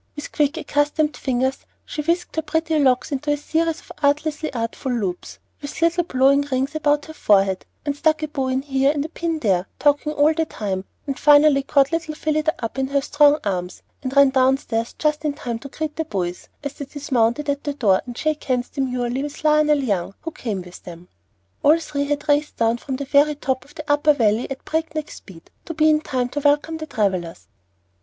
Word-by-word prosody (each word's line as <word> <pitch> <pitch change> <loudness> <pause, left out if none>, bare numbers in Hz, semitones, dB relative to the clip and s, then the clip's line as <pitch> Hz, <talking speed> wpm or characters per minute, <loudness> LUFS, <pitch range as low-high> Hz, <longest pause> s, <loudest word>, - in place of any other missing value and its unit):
With 295 - -7
quick 295 +2 +1
accustomed 295 0 0
fingers 260 0 -1 0.3
she 300 - -4
whisked 335 +3 -1
her 320 - +1
pretty 320 0 0
locks 260 -2 +2
into 285 +2 -2
a 290 - +1
series 325 +3 -1
of - - -15
artlessly 300 +2 0
artful 235 +2 -3
loops, 195 -7 -3 0.2
with 290 +1 -7
little 335 +2 +2
blowing 270 0 +3
rings 265 +2 -1
about 295 -1 +1
the 315 - -10
forehead, 195 -8 +2 0.2
and 285 -1 -1
stuck 310 +1 +1
a - - 0
bow 275 -3 -2
in 260 +1 -1
here 270 -1 +2
and 295 -1 -2
a - - -6
pin 335 -1 -2
there, 195 - +1
talking 290 +1 +2
all 300 +2 +4
the 320 0 0
time, 195 -9 -4 0.2
and 275 -2 -4
finally 290 -1 +6
caught 275 +1 +2
little 325 -2 -2
Phillida 310 0 0
up 230 - -5
in 265 - 0
her 280 +1 +1
strong 290 +1 +4
young 300 - -2
arms, 180 -3 -3 0.2
and 265 -1 -4
ran 280 -1 +6
downstairs 255 -3 +1
just 300 0 0
in 300 -2 0
time 240 -5 -5
to 275 - -9
greet 310 +2 -4
the 320 - -2
boys 180 -7 -4
as 285 -1 -4
they 285 - -7
dismounted 270 -1 0
at 285 0 -1
the 290 -1 -3
door, 200 -9 +3
and 245 -1 -7
shake 310 -1 -1
hands 250 -2 0
demurely 255 -2 -2
with 290 +1 -6
Lionel 300 -2 +3
Young, 195 -5 -1
who 330 - -5
came 210 - -4
with 180 0 -12
them. 175 0 -11 0.5
All 305 +3 +5
three 285 -3 -3
had 290 +1 -2
raced 295 0 +1
down 230 +1 +2
from 265 +1 -4
the 280 +2 -4
very 290 +2 +3
top 265 -2 -2
of 295 - -20
the 305 -2 -7
Upper 295 0 +4
Valley 225 -3 +1
at 270 -1 -7
breakneck 315 -1 -3
speed, 170 -5 -13
to 330 - -6
be 310 0 +4
in 305 0 +2
time 250 -4 -2
to 290 - -3
welcome 295 +3 +2
the 310 0 -7
travellers. 185 - -2
285 Hz, 210 wpm, -22 LUFS, 250-305 Hz, 0.5 s, finally